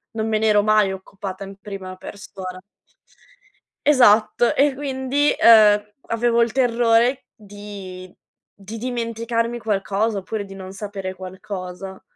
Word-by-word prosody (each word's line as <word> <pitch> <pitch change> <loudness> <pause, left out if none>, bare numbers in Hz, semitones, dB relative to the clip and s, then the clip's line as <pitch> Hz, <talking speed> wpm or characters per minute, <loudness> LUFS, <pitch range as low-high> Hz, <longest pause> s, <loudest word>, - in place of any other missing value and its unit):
non 220 0 -1
me 220 -1 +1
n'ero 215 -1 +3
mai 210 -1 +3
occupata 190 0 -7
in 195 0 -9
prima 195 -2 -8
persona. 185 -2 -9 1.2
Esatto 240 -4 +4
e 280 0 +3
quindi, 275 +1 0
uhm, 210 -2 +7 0.2
avevo 235 +1 +1
il 235 -1 +2
terrore 240 0 +2
di 200 -3 -10 0.4
di 200 +3 -9
dimenticarmi 230 0 -2
qualcosa 205 0 -1
oppure 205 +2 -5
di 195 - -11
non 190 -1 -8
sapere 195 -2 -6
qualcosa. 190 0 -8
210 Hz, 120 wpm, -21 LUFS, 195-230 Hz, 1.2 s, uhm